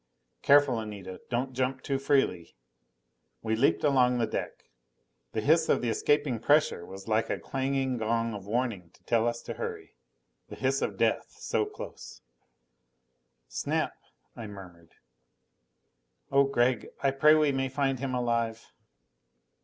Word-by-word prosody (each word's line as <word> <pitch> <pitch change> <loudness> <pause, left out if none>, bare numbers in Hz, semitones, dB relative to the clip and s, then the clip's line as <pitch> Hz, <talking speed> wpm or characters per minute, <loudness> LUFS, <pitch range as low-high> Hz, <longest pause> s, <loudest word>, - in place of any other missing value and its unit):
"Careful, 140 -4 +5
Anita. 100 -4 -7
Don't 130 +2 -1
jump 130 +1 -1
too 135 -1 -1
freely." 135 - +1 0.9
We 110 0 0
leaped 120 +5 +2
along 125 -4 +4
the 115 - +2
deck. 110 - -5 0.7
The 110 - -1
hiss 160 +6 +3
of - - +2
the 120 - +1
escaping 145 +1 +1
pressure 145 - +3
was 95 +1 -10
like 110 0 +1
a - - 0
clanging 135 -1 -1
gong 115 +1 0
of 100 -1 -8
warning 110 -6 -2
to - - -26
tell 115 0 +2
us 120 0 -2
to - - -5
hurry. 445 -3 -6 0.5
The - - -8
hiss - - 0
of - - -2
death - - 0
so - - 0
close! 420 - -10 1.2
"Snap - - -1 0.3
" - - -45
I 115 -3 -7
murmured. 90 -5 -12 1.4
"Oh, 140 0 +5
Gregg, 125 -2 +1 0.2
I 135 - +4
pray 150 +3 +5
we 155 -2 +3
may 135 -1 -1
find 135 -1 0
him 130 -1 -2
alive!" 115 -2 -1
125 Hz, 145 wpm, -29 LUFS, 110-140 Hz, 1.4 s, Careful